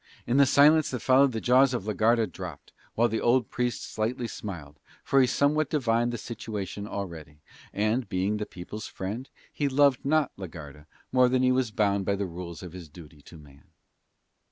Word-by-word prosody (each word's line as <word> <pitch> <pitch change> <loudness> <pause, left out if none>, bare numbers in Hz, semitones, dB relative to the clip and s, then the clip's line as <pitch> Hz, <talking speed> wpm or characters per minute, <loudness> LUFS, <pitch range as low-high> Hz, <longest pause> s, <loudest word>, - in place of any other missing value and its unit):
In 120 - +1
the 140 -1 +6
silence 150 +3 +5
that 125 - -3
followed 135 +1 +4
the 115 - -3
jaws 130 +2 +4
of 100 - -4
la 105 - -2
Garda 115 +3 +3
dropped, 90 -8 -9 0.2
while 120 +1 +3
the 110 0 -2
old 120 0 +2
Priest 120 -2 -2
slightly 115 +3 -3
smiled, 80 -10 -8 0.2
for 135 - +3
he 130 - +4
somewhat 145 +3 +1
divined 120 -5 +1
the 120 - -4
situation 105 -3 -6
already; 80 -8 -7 0.3
and, 110 +4 -1
being 95 +2 0
the 105 - -4
people's 100 +4 -8
friend, 105 +8 -6 0.2
he 145 -1 -1
loved 140 -1 +3
not 155 0 +2
la 95 -1 -6
Garda 75 -2 -11 0.2
more 125 -1 +4
than 130 0 +1
he 130 - +4
was 130 -2 +1
bound 100 -2 +1
by 100 - +1
the 100 0 -2
rules 85 0 -8
of 90 -2 -9
his 90 -4 -10
duty 75 -2 -14
to 80 - -14
man. 70 -2 -17
110 Hz, 195 wpm, -27 LUFS, 90-130 Hz, 0.3 s, the